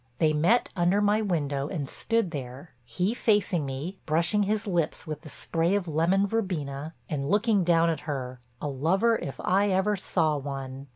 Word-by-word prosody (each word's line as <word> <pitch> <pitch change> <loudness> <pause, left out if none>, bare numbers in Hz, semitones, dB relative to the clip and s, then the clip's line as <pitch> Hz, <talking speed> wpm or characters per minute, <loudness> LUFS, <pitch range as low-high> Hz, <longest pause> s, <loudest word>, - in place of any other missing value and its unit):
They 155 -1 +3
met 175 +11 +3
under 180 +2 +2
my 210 +1 +3
window 145 -8 -1
and 150 -5 -4
stood 225 +3 0
there, 135 +1 -7
he 180 - -1
facing 200 - +1
me, 145 +9 -5
brushing 170 +6 +2
his 210 +2 0
lips 175 -6 -1
with 155 -1 -5
the 155 - -11
spray 165 +5 0
of 195 -3 -1
lemon 170 +6 +2
verbena 160 -8 -3
and 140 -2 -3
looking 210 -1 +3
down 170 -1 +4
at 160 - -3
her, 130 -3 -4 0.2
a - - -3
lover 180 - +2
if 135 - -6
ever 195 +1 +2
I - - +1
saw 160 -5 0
one. 135 -1 -6
170 Hz, 175 wpm, -27 LUFS, 145-200 Hz, 0.2 s, down